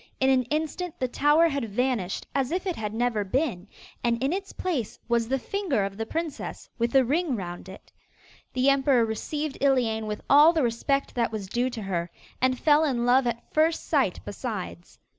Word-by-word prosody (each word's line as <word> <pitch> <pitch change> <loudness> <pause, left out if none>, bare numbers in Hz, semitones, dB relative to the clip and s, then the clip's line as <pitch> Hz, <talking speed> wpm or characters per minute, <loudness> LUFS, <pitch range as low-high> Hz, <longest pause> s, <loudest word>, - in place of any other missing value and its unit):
In 265 0 +4
an 260 -1 +4
instant 315 +5 -3
the 255 - 0
tower 295 +6 +4
had 275 -6 -3
vanished 220 -4 -1
as 270 -2 0
if 365 +3 -2
it 365 -3 -1
had 210 -2 -4
never 225 -1 0
been, 210 - -1 0.4
and 235 -1 +2
in 275 +5 +1
its 390 +1 -4
place 300 - -3
was 235 -1 +1
the 265 +3 +1
finger 305 - -1
of 195 0 -5
the 225 +1 -4
princess 325 0 -4
with 235 +2 0
a 265 -1 +6
ring 300 +2 0
round 175 -2 -6
it. 190 - -13 0.6
The 255 +1 +1
emperor 270 -3 +3
received 290 +7 -4
Iliane 235 -6 +2
with 210 0 -4
all 300 +4 +7
the 315 -4 +1
respect 265 +4 0
that 235 -2 0
was 215 -3 -4
due 240 +6 -1
to 235 -4 -6
her, 175 -3 -2 0.3
and 255 0 +2
fell 300 0 +4
in 250 -6 0
love 250 +1 +4
at 235 0 -4
first 320 +1 +2
sight - - +1
besides. - - -6
255 Hz, 195 wpm, -26 LUFS, 225-295 Hz, 0.6 s, all